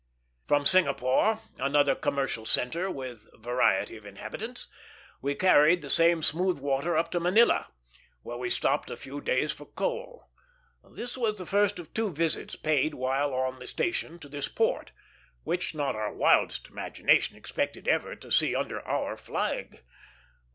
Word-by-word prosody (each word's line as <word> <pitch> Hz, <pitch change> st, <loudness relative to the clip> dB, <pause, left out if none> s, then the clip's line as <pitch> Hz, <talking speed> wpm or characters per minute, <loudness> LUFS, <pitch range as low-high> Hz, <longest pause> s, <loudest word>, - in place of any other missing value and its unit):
From 145 Hz, 0 st, +2 dB
Singapore, 155 Hz, +6 st, +3 dB, 0.2 s
another 145 Hz, +1 st, +3 dB
commercial 135 Hz, -5 st, -2 dB
centre 165 Hz, +11 st, 0 dB
with 130 Hz, -, -7 dB
variety 120 Hz, 0 st, +1 dB
of 110 Hz, -, -15 dB
inhabitants, 220 Hz, -, -3 dB, 0.5 s
we 140 Hz, +1 st, -1 dB
carried 170 Hz, -1 st, +5 dB
the 140 Hz, -, +7 dB
same 165 Hz, -1 st, +4 dB
smooth 180 Hz, +4 st, +1 dB
water 140 Hz, +4 st, 0 dB
up 165 Hz, -, 0 dB
to 175 Hz, -, 0 dB
Manila, 185 Hz, +7 st, +4 dB, 0.6 s
where 120 Hz, -, -6 dB
we 125 Hz, -1 st, -2 dB
stopped -, -, 0 dB
a -, -, -6 dB
few 140 Hz, +2 st, -8 dB
days 150 Hz, +4 st, +1 dB
for 145 Hz, -, -11 dB
coal. -, -, -4 dB, 0.5 s
This 245 Hz, 0 st, -7 dB
was 215 Hz, -3 st, 0 dB
the 185 Hz, -, -6 dB
first 205 Hz, +2 st, +2 dB
of 170 Hz, -3 st, -10 dB
two 220 Hz, -3 st, -1 dB
visits 165 Hz, 0 st, -1 dB
paid 155 Hz, 0 st, +1 dB
while 135 Hz, +3 st, 0 dB
on 130 Hz, 0 st, -1 dB
the 125 Hz, -, -9 dB
station 175 Hz, -1 st, -2 dB
to 160 Hz, -, -12 dB
this 145 Hz, 0 st, -4 dB
port, -, -, -1 dB, 0.5 s
which 175 Hz, -2 st, -2 dB
not 145 Hz, -5 st, -1 dB
our 110 Hz, -1 st, -2 dB
wildest -, -, +2 dB
imagination -, -, +1 dB
expected -, -, -3 dB
ever -, -, +1 dB
to -, -, -14 dB
see -, -, +3 dB
under -, -, -2 dB
our -, -, -2 dB
flag. -, -, -4 dB
150 Hz, 155 wpm, -28 LUFS, 135-180 Hz, 0.6 s, the